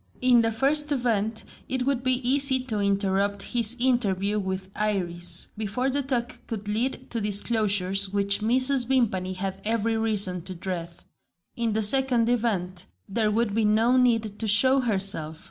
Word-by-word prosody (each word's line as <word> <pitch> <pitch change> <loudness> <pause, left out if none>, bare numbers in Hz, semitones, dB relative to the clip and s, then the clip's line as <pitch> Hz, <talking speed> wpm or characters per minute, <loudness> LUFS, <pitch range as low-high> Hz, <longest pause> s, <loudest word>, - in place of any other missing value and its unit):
In 250 -2 +4
the 225 0 0
first 290 +6 +2
event, 225 -5 -1 0.3
it 255 -1 -2
would 275 -2 -1
be 255 -1 -1
easy 270 0 +6
to 230 -5 -3
interrupt 200 0 -1
his 235 -1 +2
interview 210 -5 0
with 190 -1 -6
Iris, 175 -5 0
before 220 +5 -3
the 285 +2 0
talk 250 -3 -4
could 210 -2 -7
lead 250 +5 -2
to 230 - -2
disclosures 200 -2 +1
which 200 0 +1
Mrs. 255 +3 +2
Vimpany 200 -8 -1
had 190 +1 -6
every 225 +1 -1
reason 205 -5 +1
to 185 +2 -4
dread. 170 -1 -5 0.7
In 230 -2 -2
the 220 0 -1
second 245 0 +3
event, 190 -6 -2 0.2
there 215 +2 -1
would 215 0 -1
be 225 +1 0
no 220 +4 +2
need 230 -5 0
to 225 - -3
show 260 +6 +5
herself. 190 -9 0
220 Hz, 160 wpm, -24 LUFS, 195-245 Hz, 0.7 s, easy